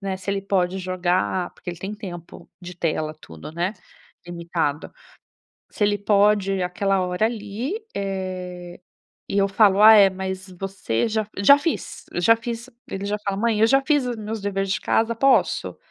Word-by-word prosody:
né, 195 -1 -3
se 190 +1 -5
ele 195 0 -2
pode 190 -1 0
jogar, 185 0 -1
porque - - -7
ele 175 - -9
tem 195 +3 -5
tempo 175 -5 -10
de 180 0 -9
tela, 155 -2 -2
tudo, 80 - -11
né, 175 +4 -1 0.5
limitado. 170 -3 -3 0.8
Se 205 - -1
ele 205 0 +1
pode 200 -2 +2
aquela 195 +2 0
hora 180 +4 +1
ali, 225 - -4 0.2
eh, 185 -3 -5 0.5
e 200 - 0
eu 200 0 +3
falo: 200 0 +4
"Ah 220 +1 +10
é, 200 -2 +8
mas 190 0 -5
você 195 - -2
já", 220 -1 -1
"Já 280 +9 +7
fiz, 305 +3 -4
já 200 +6 +4
fiz", 235 +1 -6 0.2
ele 195 +1 -5
já 210 +1 -1
fala: 200 -1 -1
"Mãe, 225 -1 +1
eu 220 - +6
já 270 +4 +3
fiz 290 -4 +2
os 245 - -3
meus 220 0 -5
dever 195 -1 -1
de 195 +2 -1
casa. 230 +1 +1
Posso? 270 +3 +2
195 Hz, 175 wpm, -23 LUFS, 180-215 Hz, 0.8 s, Ah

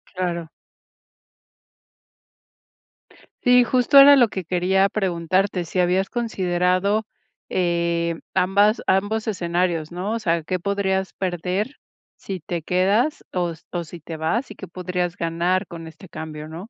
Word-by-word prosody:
Claro. 170 -3 -3 2.9
Sí, 250 0 +6
justo 255 +3 +3
era 280 +1 +10
lo 245 -3 +5
que 190 -3 -5
quería 185 +3 +2
preguntarte, 185 -1 0
si 185 - -3
habías 180 +2 +1
considerado, 195 -2 0 0.4
eh, 170 -2 0 0.2
ambas 200 +4 +3
ambos 205 +4 0
escenarios, 175 -4 -1
¿no? 180 +4 -3
O 230 - -1
sea, 170 -6 0
¿qué 185 +3 -2
podrías 190 0 -1
perder 185 - -3 0.4
si 190 -2 -6
te 170 +1 -4
quedas 200 - +1
o 175 -2 -1 0.2
o 175 -1 -3
si 170 +2 -11
te 160 +1 -8
vas 185 - -2
y - - -6
qué 190 - -9
podrías 180 0 -3
ganar 170 +3 0
con 165 -1 -9
este 160 +4 -13
cambio, 155 -2 -7
no? 170 +7 -9
185 Hz, 135 wpm, -22 LUFS, 170-200 Hz, 2.9 s, era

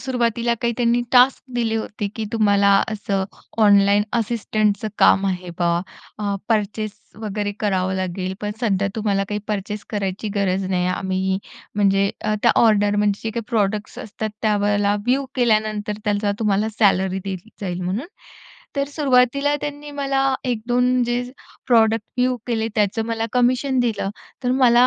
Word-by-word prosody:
सुरुवातीला 235 -2 0
काही 235 0 +1
त्यांनी 240 0 +2
टास्क 250 +1 +5
दिले 225 -2 0
होते 215 -1 -3
की 225 - -2
तुम्हाला 205 -2 +3 0.2
असं 200 -2 -1 0.4
ऑनलाईन 200 0 +5
असिस्टंटच 215 -2 0
काम 195 +1 +5
आहे 180 -2 -3
बा. 175 -1 +2 0.5
अ, 205 -1 -1
पर्चेस 215 -1 0 0.3
वगैरे 205 -1 -2
करावं 190 -3 0
लागेल 185 0 -3
पण 210 - -2
सध्या 200 -4 +1
तुम्हाला 200 -2 0
काही 210 - -2
पर्चेस 210 0 -3
करायची 200 0 -2
गरज 195 -1 +1
नाही. 180 -1 +1
आम्ही 190 +1 -1 0.4
म्हणजे 200 -1 +3
अ, 215 0 0
त्या 235 - +5
ऑर्डर 205 -2 +3
म्हणजे 205 -1 +1
जे 225 - -1
काही 230 +1 -4
प्रॉडक्ट्स 210 -2 -1
असतात 220 0 -5
त्यावेळेला 205 -1 +2
व्ह्यू 270 +3 +2
केल्यानंतर 215 -3 +1
त्याचा 205 0 +1
तुम्हाला 210 0 +1
सॅलरी 190 -3 +3
दिली 195 +2 -6
जाईल 180 -2 -3
म्हणून. 200 - -2 0.7
तर 280 - +2
सुरुवातीला 280 0 +2
त्यांनी 290 0 -6
मला 275 -1 0
1-2 250 +1 +1
जे 240 +1 0 0.4
प्रॉडक्ट 225 -3 +3
व्ह्यू 250 0 +2
केले 225 -2 -1
त्याचं 210 +2 +1
मला 225 0 -1
कमिशन 255 +2 +2
दिलं. 215 -5 -1 0.3
तर 250 - +2
मला 250 -1 +5
215 Hz, 145 wpm, -21 LUFS, 200-240 Hz, 0.7 s, टास्क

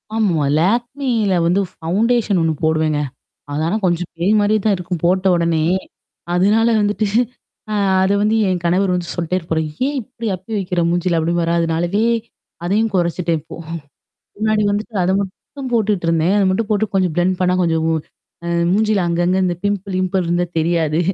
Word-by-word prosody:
ஆமா. 180 -9 +1 0.2
லேக்மில 235 - 0
வந்து 180 +4 +2
ஃபவுண்டேஷன் 210 +4 +1
ஒண்ணு 165 -1 +1
போடுவேங்க. 155 -1 +1 0.5
அது 150 +2 -1
ஆனா 180 +6 0
கொஞ்சம் 175 -1 0
பேய் 175 +5 +1
மாதிரியே 210 +1 +2
தான் 210 - +3
இருக்கும், 180 -1 -4
போட்ட 185 +2 +2
உடனேயே. 170 +1 +1 0.6
அதனால 210 +6 +3
வந்துட்டு 210 +1 0 0.7
அ - - 0 0.3
அது 190 +1 +2
வந்து 210 +2 +2
என் 185 -1 0
கணவர் 180 +2 +2
வந்து 175 -1 -3
சொல்லிட்டே 175 +1 -1
இருப்பாரு. 165 -2 -2 0.2
"ஏன் 290 +1 -2
இப்படி 230 0 -8
அப்பி 185 +4 -11
வைக்கிற 180 -2 -1
மூஞ்சியில" 175 0 +1
அப்படீம்பாரா. 170 +1 0
அதுனாலவே 170 +6 0 0.6
அதையும் 215 +5 +1
குறைச்சிட்டேன் 170 -2 0
இப்போ. 160 - -11 0.8
முன்னாடி 215 0 +1
வந்துட்டு 210 +3 -3
அதை 180 +1 +2
மட்டும் 255 +8 -7
போட்டுட்டிருந்தேன். 180 -6 +1
அதை 200 - +3
மட்டும் 205 +3 -1
போட்டு 215 0 +2
கொஞ்சம் 185 -3 +2
பிளெண்ட் 180 +1 +2
பண்ணா 180 0 +2
கொஞ்சம் 160 -2 +1
வு 165 - +2 0.5
அ - - -2 0.2
மூஞ்சியில 210 -1 +2
அங்கங்கே 175 +2 +1
இந்த 175 -1 0
பிம்பிள் 200 -1 -1
கிம்பிள் 185 0 0
இருந்தா 175 +1 +1
தெரியாது. 160 -1 +1
185 Hz, 160 wpm, -19 LUFS, 170-205 Hz, 0.8 s, தான்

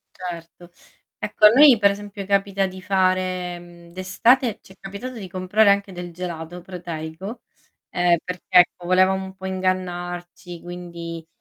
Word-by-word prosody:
Certo. 175 -1 -8 0.5
Ecco 210 - +3
a - - +12
noi 265 +2 +7
per 200 -1 +5
esempio, 200 0 -6
capita 195 -1 +1
di 185 0 -8
fare, 185 -2 0
mhmm, 170 0 -15
d'estate 225 +6 +2
ci 190 - -16
è - - -21
capitato 200 +7 -7
di 200 -5 -8
comprare 190 +4 +3
anche 200 -1 +1
del 175 -1 -7
gelato 175 0 -6
proteico, 175 +4 -7 0.5
ehm, 175 -1 +3
perch 180 0 -6
ecco 180 -1 +4
volevamo 185 +1 +3
un 190 0 -9
po' 190 0 -7
ingannarci, 175 -2 -3
quindi 170 -2 -8
185 Hz, 145 wpm, -22 LUFS, 175-195 Hz, 0.5 s, a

